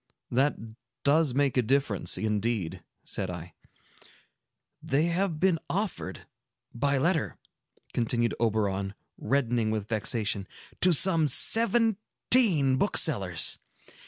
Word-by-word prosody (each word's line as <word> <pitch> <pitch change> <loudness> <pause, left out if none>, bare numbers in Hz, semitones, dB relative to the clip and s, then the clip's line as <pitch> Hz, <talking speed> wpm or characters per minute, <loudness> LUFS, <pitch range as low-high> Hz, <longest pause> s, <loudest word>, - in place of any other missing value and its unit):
"That 135 +4 +1 0.5
does 145 -2 +1
make 140 -2 0
a - - +4
difference, 125 -4 -1
indeed," 105 -4 -3 0.2
said 95 - -5
I. 85 -1 -9 1.3
"They 140 +3 -1
have 170 -1 -2
been 180 -2 +1
offered, 190 - -5 0.5
by 140 +3 -1
letter," 160 +3 -1 0.6
continued 120 0 -1
Oberon, 100 -3 -2 0.2
reddening 120 -5 -1
with 110 -2 -4
vexation, 105 -3 -2 0.3
"to 180 - +6
some 165 -1 +4
seventeen 220 - +3
booksellers. 100 - +2
130 Hz, 100 wpm, -26 LUFS, 110-165 Hz, 1.3 s, to